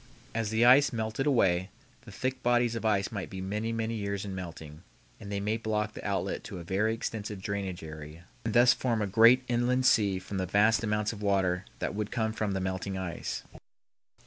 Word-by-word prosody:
As 115 -2 -1
the 110 +2 +3
ice 130 +4 +7
melted 115 +3 -2
away, 95 -9 +2 0.4
the - - -10
thick 130 0 -3
bodies 120 -1 +2
of 115 - -4
ice 100 -3 +1
might 100 -4 -5
be 95 - -7
many, 105 +4 -2
many 115 0 -2
years 100 -2 -3
in 100 - -5
melting, 80 -4 -8 0.4
and 100 - -8
they 100 - -1
might 105 +3 -1
block 105 -1 -1
the - - -9
outlet 100 -3 -2
to - - -7
a 85 - -7
very 100 +5 +1
extensive 105 -2 -4
drainage 95 -2 -4
area 80 +1 -9 0.2
and 115 0 -2
thus 120 +1 +7
form 115 -4 -1
a - - +1
great 115 +5 +6
inland 125 +2 +1
sea 105 -7 +4
from 95 +1 -6
the 95 -1 -1
vast 105 +5 +3
amounts 105 0 0
of 105 - -9
water 95 -2 +1
that - - -3
would 105 0 -3
come 110 -2 -1
from 110 -3 -2
the 95 - -1
melting 95 +1 -3
ice. 95 -3 -4
105 Hz, 205 wpm, -29 LUFS, 95-115 Hz, 0.4 s, ice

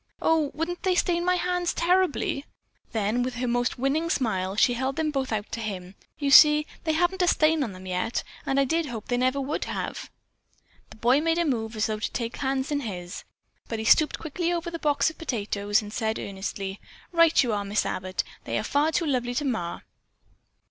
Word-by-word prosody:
"Oh, 320 -3 +2
wouldn't 340 +3 -3
they 370 -1 +1
stain 345 -1 +1
my 360 +1 +3
hands 360 -1 -1
terribly?" 350 -5 +1 0.4
Then, 220 +2 0
with 250 0 -2
her 250 +1 -2
most 245 +1 0
winning 285 +6 0
smile, 195 - 0
she 245 +3 +4
held 265 +3 -2
them 310 -1 0
both 270 -3 -2
out 215 -1 -3
to - - -4
him. 190 -4 -5 0.2
"You 280 -2 -1
see, 300 +1 +8 0.2
they 315 - +2
haven't 355 +4 +1
a 360 - +3
stain 310 -2 +3
on 220 -7 -4
them 185 0 -11
yet, 185 +5 -2 0.2
and 270 0 +1
I 275 - +4
did 325 +3 0
hope 225 -5 -7
they 245 - +1
never 255 +2 +1
would 275 +2 -2
have." - - -4 0.8
The - - -13
boy 245 +6 +3
made 330 +1 +1
a 340 - +2
move 225 -6 -1
as 215 - +1
though 215 -1 -2
to - - -2
take 235 -1 -3
the - - -9
hands 270 0 -1
in 290 - +1
his. 185 -7 -6 0.4
But 225 - -3
he 220 - -4
stooped 305 +6 +4
quickly 335 +2 -2
over 340 0 -2
the 335 - -5
box 295 +1 +2
of - - -21
potatoes 205 -6 0
and 210 0 -9
said 220 -1 -1
earnestly: 195 0 -5 0.3
"Right 335 -3 +5
you 235 -3 -1
are, 205 -1 -1
Miss 205 +1 0
Abbott. 185 0 -2 0.2
They - - -1
are - - -1
far 295 +3 +1
too 335 +1 0
lovely 245 -4 -1
to 295 - -1
mar." 220 -10 -2
265 Hz, 215 wpm, -26 LUFS, 220-320 Hz, 0.8 s, see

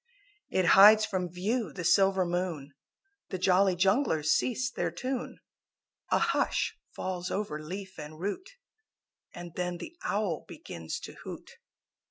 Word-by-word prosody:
It 185 - +1
hides 215 +2 +9
from 185 -4 -2
view 205 +2 -1
the 180 - -6
silver 190 +1 +4
moon, 175 -5 -3 0.6
The 185 - -3
Jolly 185 +1 +3
Junglers 180 - +2
cease 255 +9 +1
their - - -1
tune; 260 -1 -4 0.7
A - - +3
hush - - +1 0.2
falls 180 -1 -3
over 175 -7 -3
leaf 190 +3 -7
and 155 +1 -9
root 205 - -4 0.9
And 175 -1 -8
then 180 0 -2
the 320 - -9
Owl 200 -6 -1
begins 80 -1 -7
to - - -8
hoot. - - -8
185 Hz, 135 wpm, -29 LUFS, 175-205 Hz, 0.9 s, hides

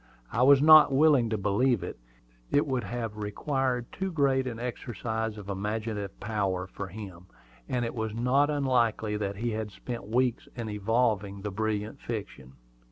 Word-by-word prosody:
I 115 - 0
was 140 +2 +6
not 155 -2 +9
willing 135 -4 +4
to 110 - 0
believe 105 +4 +1
it. - - -6 0.5
It 145 - +3
would 130 -4 -1
have 115 -3 -4
required 125 +4 -1
too 190 0 -3
great 135 -4 +2
an 120 -2 -4
exercise 115 -2 -4
of 100 -2 -9
imaginative 105 0 -3
power 100 -4 -1
for 95 +1 -7
him; 95 -3 -9 0.4
and 125 -1 0
it 115 - -4
was 110 -2 -3
not 130 +5 +2
unlikely 120 -7 +1
that 100 -1 -3
he 115 +4 -2
had 110 -1 -3
spent 115 -1 -7
weeks 125 +2 0
in 115 -3 -4
evolving 105 -2 0
the 105 - -3
brilliant 105 +1 -2
fiction. 100 - -6
115 Hz, 165 wpm, -28 LUFS, 105-125 Hz, 0.5 s, not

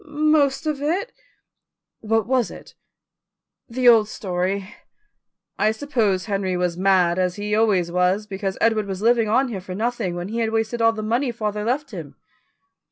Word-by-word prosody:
"Most 300 -1 +2
of 300 -2 -2
it." 365 +11 -1 0.9
"What 225 0 0
was 250 -2 +1
it?" - - -12 1.0
"The 250 +1 0
old 225 -3 +6
story." 190 +1 -3 0.9
"I 215 - +3
suppose 220 -6 0
Henry 195 -3 -1
was 180 -1 -1
mad, 185 -1 +2
as 180 -1 0
he 210 0 -3
always 205 -6 +2
was, 180 +4 +1
because 195 -1 -4
Edward 220 -2 +2
was 195 +1 -5
living 230 -2 +3
on 255 +4 +2
here 200 -5 -5
for 185 0 -7
nothing, 220 -4 -2
when 175 +2 -5
he 230 +2 -3
had 225 -1 +1
wasted 225 +1 -1
all 225 0 +4
the 215 -1 -5
money 240 +4 0
father 210 -2 -3
left 260 +7 -2
him." - - -8
215 Hz, 165 wpm, -22 LUFS, 190-240 Hz, 1.0 s, old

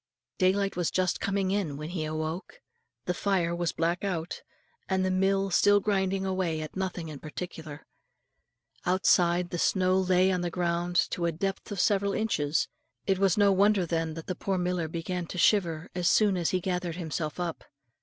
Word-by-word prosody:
Daylight 195 +2 +2
was 175 -2 0
just 185 -1 0
coming 195 -1 0
in 185 -8 -1
when 150 +2 -6
he 165 -4 -2
awoke. 155 - -4 0.5
The 180 - 0
fire 175 -3 0
was 170 -1 -1
black 170 +3 -1
out, 175 -4 -3 0.5
and 190 -1 +1
the 185 - +1
mill 195 +1 +1
still 205 +3 +5
grinding 195 -1 0
away 185 -4 -1
at 155 - -7
nothing 185 -3 -3
in 150 -3 -8
particular. 155 -1 -7 1.0
Outside, 180 -1 +3
the 175 - -3
snow 185 +1 +2
lay 185 0 +3
on 180 -1 0
the 175 - -1
ground 175 0 -1 0.2
to 170 -1 -1
a - - +1
depth 195 +6 -4
of 200 - -4
several 200 0 +2
inches; 160 -9 0 0.4
it 190 -1 +1
was 195 -2 +3
no 200 -1 +5
wonder 200 0 +3
then 165 -1 -2
that 165 - -7
the 185 - -2
poor 190 +2 -2
miller 180 -2 -1
began 170 +2 -4
to 180 - -7
shiver, 170 -5 +2
as 180 -1 0
soon 205 -1 +4
as 175 -2 0
he 185 - +1
gathered 180 -2 -2
himself 160 -2 -4
up. 175 -2 -3
180 Hz, 185 wpm, -28 LUFS, 170-190 Hz, 1.0 s, still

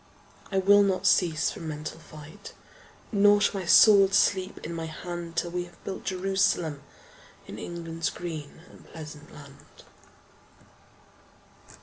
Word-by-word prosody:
I 195 - -1
will 200 +2 +5
not 195 -1 0
cease 165 -5 +2
from 165 - -8
mental 155 +1 -6
fight, 155 +5 -13 0.6
Nor 205 -1 +5
shall 205 -1 0
my 180 - -6
sword 195 -1 +6
sleep 190 -1 +1
in 170 - -5
my 165 -1 -5
hand 170 +1 -7
Till 170 0 -2
we 175 0 -3
have 175 - -20
built 190 - -7
Jerusalem 185 -5 0 0.6
In - - -9
England's 165 -1 -4
green 160 -2 -8
and - - -17
pleasant 150 -2 -11
land. 140 0 -16
175 Hz, 130 wpm, -27 LUFS, 160-195 Hz, 0.6 s, sword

